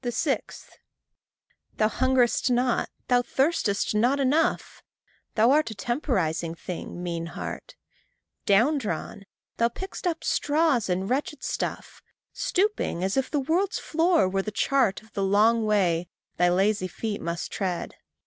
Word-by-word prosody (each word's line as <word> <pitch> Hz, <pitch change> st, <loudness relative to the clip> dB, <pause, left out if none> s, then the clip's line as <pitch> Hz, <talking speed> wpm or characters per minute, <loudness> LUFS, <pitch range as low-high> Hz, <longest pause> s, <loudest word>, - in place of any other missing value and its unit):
6. 260 Hz, +4 st, -2 dB, 1.1 s
Thou 215 Hz, -, +3 dB
hungerest 255 Hz, +1 st, +2 dB
not, 245 Hz, 0 st, +1 dB, 0.2 s
thou 245 Hz, -1 st, +4 dB
thirstest 245 Hz, -7 st, 0 dB
not 245 Hz, +6 st, +2 dB
enough. 280 Hz, +4 st, +1 dB, 0.5 s
Thou 230 Hz, +3 st, +5 dB
art 305 Hz, -2 st, +3 dB
a 220 Hz, -, -7 dB
temporizing 190 Hz, -, -1 dB
thing, 175 Hz, +1 st, -7 dB
mean 170 Hz, -1 st, -3 dB
heart. -, -, -7 dB, 0.7 s
Down 240 Hz, +10 st, +4 dB
drawn, 200 Hz, -1 st, -5 dB, 0.3 s
thou 230 Hz, -, +3 dB
pick'st 375 Hz, +7 st, -6 dB
up 330 Hz, -2 st, -2 dB
straws 295 Hz, -7 st, +1 dB
and 185 Hz, +2 st, 0 dB
wretched 270 Hz, +4 st, -2 dB
stuff, -, -, -4 dB, 0.3 s
Stooping 385 Hz, -, 0 dB
as 190 Hz, +1 st, 0 dB
if 270 Hz, -1 st, 0 dB
the 295 Hz, -, 0 dB
world's 345 Hz, +8 st, 0 dB
floor 330 Hz, -, +2 dB
were 195 Hz, +1 st, 0 dB
the 215 Hz, -, -4 dB
chart 225 Hz, -1 st, +1 dB
Of 220 Hz, -, -22 dB
the 200 Hz, -, -2 dB
long 215 Hz, +4 st, +3 dB
way 180 Hz, -5 st, +2 dB, 0.3 s
thy 175 Hz, 0 st, +4 dB
lazy 195 Hz, +2 st, +2 dB
feet 210 Hz, +3 st, -4 dB
must 170 Hz, 0 st, -4 dB
tread. 185 Hz, -3 st, -3 dB
230 Hz, 140 wpm, -26 LUFS, 195-275 Hz, 1.1 s, Thou